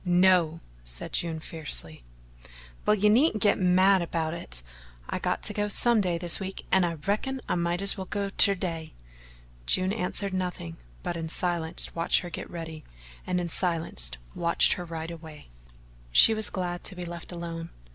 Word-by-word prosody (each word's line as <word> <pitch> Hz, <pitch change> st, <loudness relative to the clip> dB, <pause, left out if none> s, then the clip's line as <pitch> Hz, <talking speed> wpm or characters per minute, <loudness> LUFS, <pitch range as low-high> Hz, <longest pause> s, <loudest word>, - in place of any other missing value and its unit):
"No," 175 Hz, -3 st, +3 dB, 0.2 s
said -, -, -5 dB
June 165 Hz, -2 st, -1 dB
fiercely. 150 Hz, -, -3 dB, 0.8 s
"Well, 210 Hz, -, +5 dB
you 210 Hz, 0 st, +2 dB
needn't 220 Hz, 0 st, +3 dB
git 205 Hz, -, +3 dB
mad 185 Hz, +1 st, +4 dB
about 165 Hz, -1 st, -2 dB
it -, -, -9 dB, 0.4 s
I -, -, -3 dB
got -, -, -2 dB
to -, -, -3 dB
go 205 Hz, 0 st, -1 dB
some 230 Hz, +2 st, +2 dB
day 180 Hz, -3 st, 0 dB
this 175 Hz, -1 st, +3 dB
week, 190 Hz, -1 st, -6 dB
and 190 Hz, -, +4 dB
I 170 Hz, -, -3 dB
reckon 210 Hz, -, -2 dB
I -, -, 0 dB
might 175 Hz, +2 st, -1 dB
as 200 Hz, -, +5 dB
well 190 Hz, -, -5 dB
go 200 Hz, 0 st, -3 dB
ter 200 Hz, 0 st, +6 dB
day." 165 Hz, -4 st, -5 dB, 0.7 s
June 185 Hz, +1 st, +2 dB
answered 200 Hz, -1 st, -3 dB
nothing, 180 Hz, -, -4 dB, 0.3 s
but 175 Hz, -, -3 dB
in 165 Hz, -1 st, -4 dB
silence 170 Hz, -1 st, 0 dB
watched 165 Hz, 0 st, +2 dB
her 175 Hz, -, -8 dB
get -, -, -6 dB
ready 160 Hz, -2 st, -7 dB, 0.4 s
and 180 Hz, 0 st, 0 dB
in 175 Hz, -1 st, -3 dB
silence 165 Hz, -, 0 dB, 0.2 s
watched 170 Hz, 0 st, +4 dB
her 180 Hz, -, -6 dB
ride 165 Hz, 0 st, -6 dB
away. 160 Hz, -, -11 dB, 0.6 s
She 220 Hz, -, +8 dB
was 220 Hz, -1 st, -1 dB
glad 175 Hz, -2 st, -4 dB
to 190 Hz, -, -4 dB
be 180 Hz, -1 st, -5 dB
left 170 Hz, 0 st, -7 dB
alone. 170 Hz, -1 st, -6 dB
175 Hz, 175 wpm, -27 LUFS, 165-190 Hz, 0.8 s, She